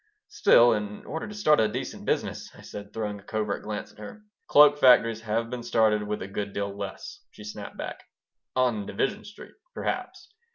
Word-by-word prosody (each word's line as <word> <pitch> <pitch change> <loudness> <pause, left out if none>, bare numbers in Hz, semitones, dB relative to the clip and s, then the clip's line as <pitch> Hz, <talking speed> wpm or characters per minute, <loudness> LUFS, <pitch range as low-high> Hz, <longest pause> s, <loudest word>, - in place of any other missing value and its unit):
"Still, 120 - +5
in 105 -1 -4
order 160 - -5
to 210 - -8
start 155 -8 +4
a 110 - +4
decent 105 - -5
business - - -2
" - - -21
I - - -13
said, 100 0 -9
throwing 105 -2 -4
a - - -17
covert 105 -1 -2
glance 105 -1 -5
at - - -21
her 110 - -10 0.2
"Cloak 145 0 +7
factories 115 -4 +5
have 115 +1 -2
been 125 -1 -4
started 110 -2 +2
with 105 -1 -3
a - - -6
good 100 +1 -4
deal 100 0 -3
less," 100 -1 -7
she 105 - -13
snapped 105 -1 -8
back - - -6 0.5
"On 120 -5 +1
Division 210 +1 -2
Street, 205 0 -12 0.2
perhaps." - - -4
110 Hz, 195 wpm, -27 LUFS, 105-125 Hz, 0.5 s, Cloak